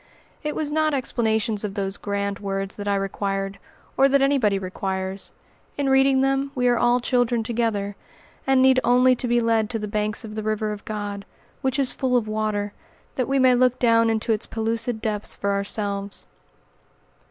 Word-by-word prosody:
It 300 Hz, 0 st, -3 dB
was 300 Hz, -2 st, -2 dB
not 310 Hz, -1 st, +2 dB
explanations 220 Hz, -4 st, 0 dB
of 200 Hz, -2 st, -4 dB
those 195 Hz, -1 st, -2 dB
grand 200 Hz, -1 st, -3 dB
words 195 Hz, -1 st, -3 dB
that 205 Hz, 0 st, -5 dB
I 200 Hz, -, +2 dB
required, 195 Hz, 0 st, -2 dB, 0.4 s
or 270 Hz, +1 st, +5 dB
that 280 Hz, +1 st, +4 dB
anybody 255 Hz, -8 st, +3 dB
requires. 190 Hz, 0 st, -3 dB, 0.5 s
In 280 Hz, -1 st, 0 dB
reading 270 Hz, 0 st, +4 dB
them 270 Hz, +1 st, +1 dB
we 250 Hz, -1 st, +1 dB
are 240 Hz, -, +3 dB
all 240 Hz, +1 st, +3 dB
children 245 Hz, -2 st, +1 dB
together, 220 Hz, -3 st, -1 dB, 0.5 s
and 265 Hz, -1 st, +4 dB
need 260 Hz, 0 st, +6 dB
only 250 Hz, +1 st, +5 dB
to 250 Hz, -, -3 dB
be 240 Hz, 0 st, +3 dB
led 225 Hz, -2 st, +1 dB
to 230 Hz, -, -2 dB
the 210 Hz, -1 st, -4 dB
banks 210 Hz, +2 st, -2 dB
of 215 Hz, -, -8 dB
the 215 Hz, -, -3 dB
river 215 Hz, 0 st, -1 dB
of 210 Hz, -1 st, -7 dB
God, 205 Hz, -2 st, -4 dB, 0.4 s
which 265 Hz, 0 st, 0 dB
is 270 Hz, -2 st, +2 dB
full 255 Hz, -2 st, +1 dB
of 225 Hz, -3 st, -1 dB
water, 215 Hz, -1 st, -2 dB, 0.4 s
that 255 Hz, -, -1 dB
we 275 Hz, +1 st, +1 dB
may 255 Hz, -1 st, +5 dB
look 250 Hz, 0 st, +3 dB
down 230 Hz, -1 st, +4 dB
into 225 Hz, 0 st, +1 dB
its 215 Hz, -, -2 dB
pellucid 225 Hz, 0 st, -2 dB
depths 210 Hz, -2 st, -2 dB
for 200 Hz, -, -1 dB
ourselves. 200 Hz, 0 st, -2 dB
220 Hz, 185 wpm, -23 LUFS, 205-255 Hz, 0.5 s, need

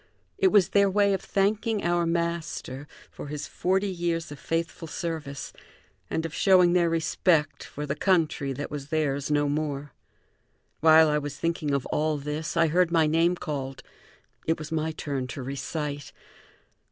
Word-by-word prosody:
It 385 Hz, -, +5 dB
was 205 Hz, -, +4 dB
their 200 Hz, -1 st, +4 dB
way 200 Hz, +1 st, +3 dB
of 190 Hz, -, -1 dB
thanking 210 Hz, +2 st, 0 dB
our 175 Hz, 0 st, +1 dB
master 170 Hz, -4 st, -3 dB, 0.2 s
for -, -, -8 dB
his 150 Hz, 0 st, -5 dB
forty 190 Hz, +2 st, 0 dB
years 170 Hz, -3 st, -2 dB
of 145 Hz, -, -8 dB
faithful 165 Hz, 0 st, -3 dB
service 155 Hz, -4 st, -5 dB, 0.6 s
and 160 Hz, -, -1 dB
of 165 Hz, -, -5 dB
showing 180 Hz, -2 st, +5 dB
their 175 Hz, -2 st, +3 dB
respect 165 Hz, -1 st, +1 dB
for 150 Hz, -, -6 dB
the 140 Hz, -, -1 dB
country 160 Hz, -4 st, +1 dB
that 140 Hz, +2 st, -5 dB
was 145 Hz, -2 st, -5 dB
theirs 145 Hz, -3 st, -1 dB
no 145 Hz, -1 st, +2 dB
more. 145 Hz, -1 st, -2 dB, 0.9 s
While 160 Hz, 0 st, +7 dB
I 150 Hz, 0 st, +2 dB
was 145 Hz, -1 st, -6 dB
thinking 165 Hz, -3 st, -1 dB
of 140 Hz, -2 st, 0 dB
all 155 Hz, 0 st, +1 dB
this, 150 Hz, +3 st, -4 dB
I 165 Hz, -, +5 dB
heard 175 Hz, +2 st, +3 dB
my 165 Hz, -2 st, +4 dB
name 165 Hz, +3 st, +3 dB
called. 135 Hz, -5 st, -5 dB, 0.6 s
It 160 Hz, -, +2 dB
was 155 Hz, 0 st, -8 dB
my 160 Hz, 0 st, -1 dB
turn 140 Hz, -4 st, -4 dB
to 130 Hz, +2 st, -6 dB
recite. 145 Hz, +2 st, -4 dB
160 Hz, 165 wpm, -27 LUFS, 145-170 Hz, 0.9 s, While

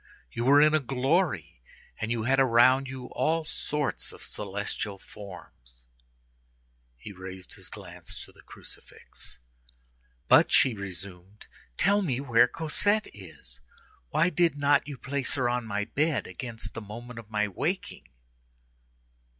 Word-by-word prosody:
You 120 Hz, -, -2 dB
were 140 Hz, +2 st, +7 dB
in 155 Hz, +1 st, +6 dB
a 155 Hz, -, +5 dB
glory, 130 Hz, -, 0 dB, 0.4 s
and 110 Hz, -, -2 dB
you 115 Hz, -1 st, 0 dB
had 135 Hz, +3 st, +3 dB
around 130 Hz, +1 st, +5 dB
you 130 Hz, -1 st, -6 dB
all 160 Hz, 0 st, +1 dB
sorts 150 Hz, -1 st, -2 dB
of -, -, -13 dB
celestial 100 Hz, 0 st, -3 dB
forms." -, -, -11 dB, 1.1 s
He 105 Hz, -, -9 dB
raised 95 Hz, -1 st, -8 dB
his -, -, -7 dB
glance -, -, -9 dB
to -, -, -17 dB
the -, -, -19 dB
crucifix. -, -, -12 dB, 0.9 s
"But," -, -, +6 dB
she 130 Hz, -, +5 dB
resumed, 95 Hz, 0 st, -8 dB, 0.3 s
"tell 205 Hz, +1 st, +4 dB
me 135 Hz, -10 st, 0 dB
where 120 Hz, -3 st, +5 dB
Cosette 205 Hz, -, 0 dB
is. 80 Hz, -11 st, -10 dB, 0.5 s
Why 170 Hz, -, +3 dB
did 170 Hz, -3 st, +2 dB
not 145 Hz, 0 st, +3 dB
you 145 Hz, -3 st, -6 dB
place 135 Hz, +2 st, -2 dB
her 130 Hz, -3 st, +1 dB
on 120 Hz, -1 st, -1 dB
my 105 Hz, -1 st, -1 dB
bed 150 Hz, +4 st, 0 dB
against 115 Hz, -3 st, -7 dB
the 115 Hz, -, -5 dB
moment 115 Hz, +3 st, -8 dB
of 110 Hz, -2 st, -12 dB
my 105 Hz, -1 st, +1 dB
waking?" 95 Hz, -, -3 dB
120 Hz, 140 wpm, -28 LUFS, 100-140 Hz, 1.1 s, were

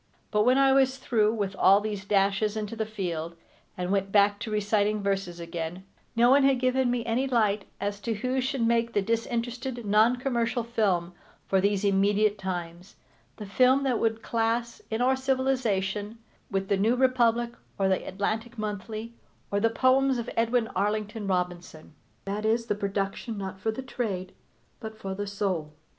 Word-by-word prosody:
But 210 Hz, 0 st, +2 dB
when 255 Hz, +2 st, +5 dB
I 270 Hz, -1 st, +5 dB
was 265 Hz, -1 st, +3 dB
through 220 Hz, -5 st, +2 dB
with 200 Hz, -3 st, -2 dB
all 195 Hz, +1 st, +6 dB
these 205 Hz, -1 st, -4 dB
dashes 200 Hz, +1 st, +1 dB
into 215 Hz, +1 st, -4 dB
the 220 Hz, -1 st, -2 dB
field, 170 Hz, -6 st, -4 dB, 0.4 s
and 180 Hz, 0 st, -2 dB
went 195 Hz, -1 st, 0 dB
back 205 Hz, 0 st, +4 dB
to 225 Hz, -, -5 dB
reciting 210 Hz, 0 st, +1 dB
verses 195 Hz, -3 st, -2 dB
again, 170 Hz, +1 st, -5 dB, 0.3 s
no 240 Hz, +2 st, +5 dB
one 280 Hz, +1 st, +6 dB
had 270 Hz, -2 st, +4 dB
given 255 Hz, 0 st, +2 dB
me 240 Hz, -1 st, -1 dB
any 240 Hz, +4 st, 0 dB
light 215 Hz, -5 st, +1 dB
as 200 Hz, 0 st, -3 dB
to 225 Hz, +2 st, -2 dB
who 255 Hz, +5 st, -1 dB
should 260 Hz, -2 st, -1 dB
make 235 Hz, 0 st, +1 dB
the 205 Hz, -, +1 dB
disinterested, 235 Hz, +2 st, -2 dB
non 215 Hz, +4 st, +4 dB
commercial 240 Hz, -2 st, -1 dB
film 195 Hz, -7 st, 0 dB, 0.3 s
for 190 Hz, -1 st, +2 dB
these 200 Hz, 0 st, +1 dB
immediate 205 Hz, +1 st, +2 dB
times, 180 Hz, -1 st, -5 dB, 0.4 s
the 210 Hz, -, -7 dB
film 255 Hz, +7 st, +3 dB
that 255 Hz, -4 st, +1 dB
would 225 Hz, 0 st, 0 dB
class, 230 Hz, +1 st, -1 dB
in 220 Hz, +2 st, -2 dB
our 260 Hz, +1 st, +3 dB
civilization, 235 Hz, -6 st, -1 dB, 0.3 s
with 195 Hz, -2 st, -1 dB
The 200 Hz, -, +2 dB
New 220 Hz, +5 st, +2 dB
Republic 240 Hz, -2 st, +2 dB, 0.3 s
or 195 Hz, -, +2 dB
The 190 Hz, -1 st, +1 dB
Atlantic 220 Hz, +5 st, -3 dB
Monthly 215 Hz, +2 st, -5 dB, 0.4 s
or 200 Hz, -, +1 dB
the 225 Hz, +2 st, +3 dB
poems 260 Hz, +2 st, +3 dB
of 235 Hz, -, -4 dB
Edwin 230 Hz, 0 st, +2 dB
Arlington 210 Hz, +2 st, -2 dB
Robinson. 180 Hz, -4 st, -3 dB, 0.3 s
That 200 Hz, +2 st, -3 dB
is, 225 Hz, +2 st, +1 dB
the 230 Hz, -, 0 dB
production 200 Hz, +2 st, -3 dB
not 190 Hz, -1 st, -6 dB
for 205 Hz, -, -2 dB
the 220 Hz, +4 st, -3 dB
trade, 200 Hz, -8 st, -4 dB, 0.5 s
but 220 Hz, 0 st, -8 dB
for 195 Hz, -3 st, -5 dB
the 205 Hz, +1 st, -4 dB
soul. 190 Hz, -7 st, -2 dB
215 Hz, 175 wpm, -27 LUFS, 195-235 Hz, 0.5 s, all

